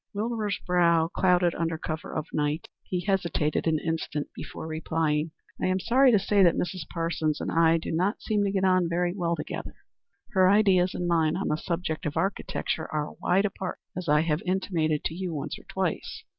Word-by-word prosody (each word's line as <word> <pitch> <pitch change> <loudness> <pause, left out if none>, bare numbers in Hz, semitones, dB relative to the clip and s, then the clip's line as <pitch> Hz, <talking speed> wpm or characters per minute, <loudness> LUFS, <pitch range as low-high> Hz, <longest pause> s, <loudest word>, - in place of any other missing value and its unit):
Wilbur's 215 -1 -1
brow 170 -2 +3
clouded 180 -1 +3
under 165 -1 -1
cover 155 0 -5
of 155 - -3
the - - -3
night. 150 +2 -1
He 180 -1 -3
hesitated 170 -6 0
an 160 -1 +3
instant 160 -2 -3
before - - -8
replying, 160 -1 -1 0.3
"I - - +2
am 185 0 +1
sorry 255 +6 +4
to 215 - +5
say 200 +1 +2
that 175 -3 +5
Mrs. 180 -4 -3
Parsons 165 -2 -1
and - - -3
I 165 0 +4
do 165 - -5
not 185 +6 0
seem 210 -2 +1
to 200 - +1
get 195 -1 0
on 185 -2 +3
very 175 +1 0
well 170 -3 -1
together. - - -6 0.6
Her 185 -3 +5
ideas 190 -3 +4
and 175 - -2
mine 165 -1 +2
on 195 - -2
the - - +2
subject 165 -1 -3
of 150 - -4
architecture 195 -4 -2
are 150 -1 -2
wide 190 +3 +3
apart, 190 -2 -4 0.2
as 180 -3 -4
I 150 0 +5
have 155 -1 0
intimated 170 -5 0
to - - -2
you 180 -1 -4
once 145 - -4
or - - -18
twice. - - -3
170 Hz, 200 wpm, -27 LUFS, 160-190 Hz, 0.6 s, to